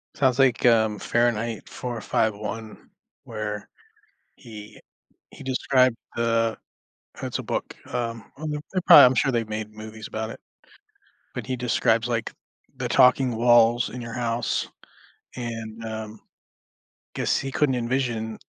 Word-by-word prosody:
Sounds 130 Hz, -1 st, +2 dB
like, 130 Hz, -3 st, +3 dB
um, 110 Hz, -3 st, +4 dB
Fahrenheit 115 Hz, -1 st, 0 dB
451, 110 Hz, -2 st, -3 dB, 0.3 s
where 105 Hz, -2 st, -5 dB, 0.7 s
he 105 Hz, -2 st, -11 dB, 0.5 s
he -, -, -12 dB
described 130 Hz, -1 st, +2 dB, 0.2 s
the 115 Hz, -1 st, +1 dB, 0.7 s
it's -, -, -3 dB
a -, -, -5 dB
book, -, -, -4 dB
um 115 Hz, -3 st, -4 dB
um, 155 Hz, 0 st, -4 dB
they 150 Hz, -, -2 dB, 0.2 s
they 185 Hz, -, +1 dB
prob -, -, +10 dB
I'm -, -, -2 dB
sure 135 Hz, -, +2 dB
they've 115 Hz, -2 st, -1 dB
made 110 Hz, 0 st, -4 dB
movies 110 Hz, 0 st, -9 dB
about 110 Hz, 0 st, -4 dB
it. -, -, -9 dB, 0.9 s
When -, -, -5 dB
he 130 Hz, 0 st, -2 dB
describes, 115 Hz, -1 st, +1 dB
like, 115 Hz, -2 st, -2 dB, 0.5 s
the -, -, -2 dB
talking 125 Hz, -1 st, +4 dB
walls 120 Hz, 0 st, +4 dB
in 125 Hz, 0 st, -7 dB
your 115 Hz, -1 st, -7 dB
house, 120 Hz, -1 st, -1 dB, 0.7 s
and, 115 Hz, -2 st, -6 dB
um, 110 Hz, -1 st, -6 dB, 1.0 s
guess -, -, +1 dB
he 135 Hz, 0 st, -4 dB
couldn't 150 Hz, -4 st, +2 dB
envision, 120 Hz, -3 st, -2 dB
115 Hz, 135 wpm, -25 LUFS, 110-125 Hz, 1.0 s, prob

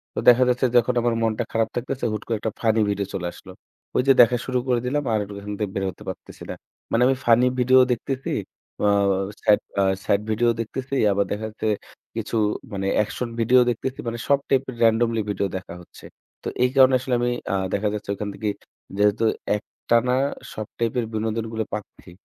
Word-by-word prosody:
তো -, -, -1 dB
দেখা 125 Hz, +1 st, +6 dB
যাচ্ছে 125 Hz, +1 st, +2 dB
যখন 120 Hz, +1 st, +3 dB
আমার 120 Hz, -1 st, +1 dB
মনটা 110 Hz, +1 st, 0 dB
খারাপ 115 Hz, 0 st, +1 dB
থাকতেছে, 125 Hz, +1 st, -3 dB
হুট 105 Hz, -, -4 dB
করে 115 Hz, -2 st, 0 dB
একটা 110 Hz, +1 st, -2 dB
funny 110 Hz, -1 st, +3 dB
video 100 Hz, 0 st, -1 dB
চলে 90 Hz, -2 st, -2 dB
আসলো। -, -, -13 dB, 0.4 s
ঐ -, -, +2 dB
যে 135 Hz, -, +8 dB
দেখা 120 Hz, +1 st, +5 dB
শুরু 130 Hz, -1 st, 0 dB
করে 125 Hz, -2 st, +2 dB
দিলাম, 145 Hz, +4 st, 0 dB
আর 110 Hz, -, +2 dB
ও -, -, -6 dB
এখান 105 Hz, +1 st, -5 dB
থেকে 105 Hz, -3 st, -2 dB
বের 95 Hz, -, -1 dB
হতে -, -, -15 dB
পারতেছি -, -, -9 dB
না। -, -, -3 dB, 0.4 s
মানে 115 Hz, -, +2 dB
আমি 135 Hz, -, +3 dB
funny 120 Hz, +2 st, +5 dB
video 130 Hz, +1 st, +5 dB
ও -, -, +2 dB
দেখতেছি, 130 Hz, +3 st, -4 dB, 0.5 s
আ -, -, +4 dB, 0.6 s
sad 105 Hz, -2 st, +5 dB, 0.2 s
আ -, -, +4 dB, 0.2 s
sad 100 Hz, -, +2 dB
video 115 Hz, +2 st, +2 dB
দেখতেছি, 130 Hz, +4 st, -4 dB, 0.2 s
আবার 100 Hz, 0 st, +1 dB
দেখা 105 Hz, +2 st, -2 dB
যাচ্ছে 110 Hz, 0 st, -4 dB, 0.5 s
কিছু -, -, -3 dB, 0.4 s
মানে 95 Hz, 0 st, -2 dB, 0.2 s
action 120 Hz, +3 st, -4 dB
video 120 Hz, +3 st, +5 dB
দেখতেছি। 125 Hz, +3 st, -3 dB
মানে 115 Hz, 0 st, -3 dB
সব 140 Hz, -1 st, +4 dB
type 135 Hz, 0 st, +2 dB
এর 130 Hz, -, -6 dB
randomly 115 Hz, 0 st, +3 dB
video 100 Hz, -1 st, 0 dB
দেখা 90 Hz, -2 st, -9 dB
হচ্ছে। 85 Hz, -, -15 dB, 0.4 s
তো -, -, -5 dB, 0.2 s
এই 125 Hz, -, +4 dB
কারণে 130 Hz, -1 st, +7 dB
আসলে 130 Hz, 0 st, -3 dB
আমি 120 Hz, 0 st, +1 dB, 0.2 s
আ -, -, +2 dB, 0.2 s
দেখা 105 Hz, +1 st, +1 dB
যাচ্ছে, 105 Hz, -1 st, -6 dB
ওইখান 105 Hz, +1 st, -4 dB
থেকে 105 Hz, -2 st, -2 dB, 0.5 s
যেহেতু 105 Hz, +2 st, +3 dB, 0.3 s
একটানা 120 Hz, +3 st, 0 dB, 0.4 s
সব 110 Hz, -1 st, -5 dB
type 115 Hz, -1 st, -1 dB
এর 115 Hz, -, -1 dB
বিনোদনগুলো 110 Hz, +1 st, -2 dB
পাচ্ছি, 105 Hz, -3 st, -7 dB
115 Hz, 200 wpm, -23 LUFS, 105-125 Hz, 0.6 s, যে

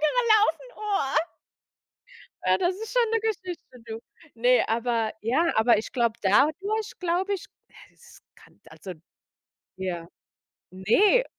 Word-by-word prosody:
gelaufen, 435 Hz, +6 st, +3 dB
oh. 405 Hz, -10 st, -1 dB, 1.3 s
Ja, -, -, +3 dB
das 365 Hz, 0 st, +1 dB
ist 440 Hz, +2 st, -7 dB
schon 480 Hz, -3 st, +2 dB
'ne 455 Hz, -, +2 dB
Geschichte, 370 Hz, -, -5 dB
du. 225 Hz, -1 st, -6 dB, 0.4 s
Ne, 245 Hz, +1 st, +3 dB
aber 230 Hz, -1 st, 0 dB
ja 290 Hz, +10 st, +1 dB
aber 220 Hz, 0 st, +5 dB
ich 215 Hz, -, -6 dB
glaube 235 Hz, -3 st, 0 dB
dadurch, 335 Hz, -, +2 dB
glaube 365 Hz, +3 st, 0 dB
ich 385 Hz, -, -7 dB, 0.2 s
ja, -, -, -23 dB, 0.2 s
es -, -, -18 dB
kann -, -, -22 dB
also 190 Hz, -, -9 dB, 0.8 s
Ja. 175 Hz, -3 st, -4 dB, 0.6 s
Ne! 310 Hz, -, +3 dB
310 Hz, 125 wpm, -26 LUFS, -, 1.3 s, aber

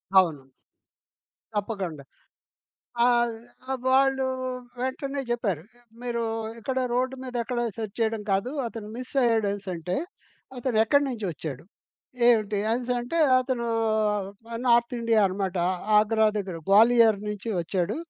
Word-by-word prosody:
అవును. 160 Hz, -8 st, +4 dB, 1.1 s
తప్పకుండా. 195 Hz, -8 st, -3 dB, 1.0 s
ఆహ్, 240 Hz, -1 st, +3 dB, 0.5 s
వాళ్ళు 270 Hz, 0 st, +3 dB, 0.6 s
వెంటనే 275 Hz, +2 st, -2 dB
జెప్పారు. 205 Hz, -9 st, -1 dB, 0.4 s
మీరు 235 Hz, -1 st, -2 dB, 0.4 s
ఇక్కడ 260 Hz, +3 st, -2 dB, 0.2 s
రోడ్డు 255 Hz, +1 st, 0 dB
మీద 255 Hz, -1 st, -7 dB
ఎక్కడ 240 Hz, +1 st, -2 dB, 0.2 s
సెర్చ్ 220 Hz, -2 st, -5 dB
చేయడం 220 Hz, -1 st, 0 dB
కాదు. 195 Hz, +6 st, 0 dB, 0.2 s
అతను 225 Hz, -2 st, -7 dB
మిసయ్యాడు 245 Hz, -4 st, +1 dB
అనేసంటే, 185 Hz, -3 st, -4 dB, 0.6 s
అతనెక్కడి 245 Hz, +3 st, +2 dB
నుంచి 235 Hz, -5 st, -4 dB
ఒచ్చాడు, 145 Hz, -2 st, -7 dB, 0.6 s
ఏవిటి, 215 Hz, -3 st, +3 dB
అనెసంటే 245 Hz, +5 st, -1 dB, 0.2 s
అతను 250 Hz, -2 st, -2 dB, 1.0 s
నార్తిండియ 235 Hz, -1 st, +3 dB
అనమాట. 190 Hz, -1 st, -2 dB, 0.4 s
ఆగ్రా 220 Hz, +1 st, +3 dB
దగ్గర 190 Hz, -4 st, -4 dB
గ్వాలియర్ 225 Hz, +1 st, +6 dB
నుంచి 210 Hz, +1 st, -5 dB
ఒచ్చాడు. 180 Hz, +3 st, -1 dB
225 Hz, 100 wpm, -26 LUFS, 200-245 Hz, 1.1 s, గ్వాలియర్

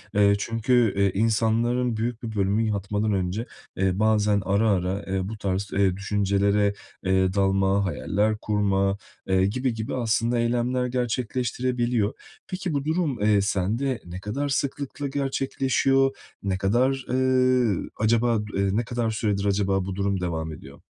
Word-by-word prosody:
Eee, 100 Hz, 0 st, +5 dB
çünkü, 115 Hz, 0 st, +2 dB
eee, 100 Hz, -1 st, +3 dB
insanların 115 Hz, +3 st, +1 dB
büyük 115 Hz, +1 st, -3 dB
bir 110 Hz, -2 st, -5 dB
bölümü 100 Hz, +2 st, +1 dB
yatmadan 105 Hz, 0 st, -1 dB
önce, 95 Hz, +5 st, -1 dB, 0.3 s
eee, 95 Hz, +1 st, +1 dB
bazen 105 Hz, -2 st, +3 dB
ara 100 Hz, +3 st, +2 dB
ara, 95 Hz, +1 st, 0 dB
eee, 95 Hz, 0 st, -1 dB
bu 110 Hz, -, -6 dB
tarz, 100 Hz, 0 st, -2 dB
eee, 95 Hz, -2 st, +2 dB
düşüncelere, 100 Hz, 0 st, +1 dB, 0.3 s
eee, 95 Hz, 0 st, +2 dB
dalma, 95 Hz, 0 st, +2 dB
hayaller 105 Hz, +4 st, 0 dB
kurma, 100 Hz, -2 st, +1 dB, 0.3 s
eee, 95 Hz, 0 st, +3 dB
gibi 125 Hz, +4 st, -1 dB
gibi 110 Hz, +2 st, -4 dB
aslında 115 Hz, 0 st, +1 dB
eylemler 120 Hz, +2 st, 0 dB
gerçekleştirebiliyor. 125 Hz, -1 st, -1 dB, 0.3 s
Peki, 185 Hz, -3 st, -3 dB
bu 140 Hz, 0 st, -1 dB
durum, 155 Hz, -, -1 dB
eee, 105 Hz, -1 st, +4 dB
sende 115 Hz, +7 st, -1 dB
ne 90 Hz, +1 st, -7 dB
kadar 135 Hz, +9 st, -3 dB
sıklıkla 140 Hz, +1 st, -2 dB
gerçekleşiyor, 135 Hz, -1 st, +1 dB, 0.3 s
ne 95 Hz, -2 st, -1 dB
kadar, 125 Hz, +7 st, +1 dB
eee, 130 Hz, -4 st, +2 dB
acaba 115 Hz, 0 st, +2 dB
du 105 Hz, -, -6 dB
eee, 100 Hz, 0 st, +2 dB
ne 120 Hz, -, +1 dB
kadar 120 Hz, -2 st, -1 dB
süredir 105 Hz, -2 st, -1 dB
acaba 95 Hz, -1 st, +1 dB
bu 95 Hz, -1 st, -4 dB
durum 100 Hz, -1 st, -1 dB
devam 80 Hz, -2 st, -3 dB
ediyor? 70 Hz, -2 st, -12 dB
105 Hz, 145 wpm, -25 LUFS, 100-125 Hz, 0.3 s, Eee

